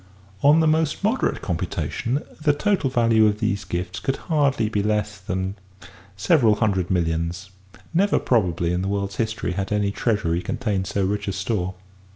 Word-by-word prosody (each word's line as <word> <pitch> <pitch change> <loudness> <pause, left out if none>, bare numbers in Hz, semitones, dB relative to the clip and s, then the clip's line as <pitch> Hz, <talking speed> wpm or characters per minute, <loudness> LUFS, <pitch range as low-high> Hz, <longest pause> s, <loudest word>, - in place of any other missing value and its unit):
On 150 +3 +6
the 160 - +3
most 155 +2 +1
moderate 225 +6 0
computation, 90 - -2 0.2
the 150 -1 +3
total 185 -2 +1
value 115 -3 +4
of 105 0 0
these 105 -3 -1
gifts 90 +2 -4
could 120 +7 -1
hardly 140 -8 +1
be 105 -1 0
less 105 0 -1
than 95 +1 -3 0.6
several 115 - +4
hundred 95 -5 0
millions; 85 +1 -1 0.4
never 195 +4 +3
probably 90 -7 +1
in 90 - 0
the 95 - -2
world's 100 0 -2
history 110 -4 -1
had 95 +2 -3
any 105 -1 +1
treasury 100 -6 0
contained 105 -4 -2
so 100 -1 0
rich 100 +1 -2
a - - 0
store. 95 -2 -2
105 Hz, 165 wpm, -23 LUFS, 95-120 Hz, 0.6 s, On